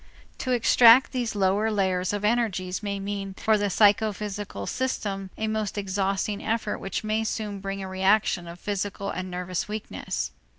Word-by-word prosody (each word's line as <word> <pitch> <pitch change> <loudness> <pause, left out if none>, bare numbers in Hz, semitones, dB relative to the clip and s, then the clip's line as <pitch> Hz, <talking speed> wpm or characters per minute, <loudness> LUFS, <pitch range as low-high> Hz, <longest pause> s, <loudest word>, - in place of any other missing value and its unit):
To 255 - -2
extract 240 +1 +6
these 245 -4 -2
lowest 205 +3 +2
layers 185 -2 +1
of 205 0 -2
energies 210 -5 0
may 200 -1 -3
mean 195 -1 -4
for 220 +2 +2
the 205 -1 0
psychophysical 205 - +1
system 200 - -2
a 220 - -1
most 215 -1 -2
exhausting 195 +1 -1
effort 225 -1 -1
which 195 +2 -4
may 215 +1 0
soon 210 -2 -3
bring 195 0 -4
a - - -5
reaction 190 -1 +2
of 170 +1 -9
physical 200 0 -3
and 185 0 -4
nervous 180 0 -3
weakness. 215 0 -4
205 Hz, 160 wpm, -26 LUFS, 190-215 Hz, -, extract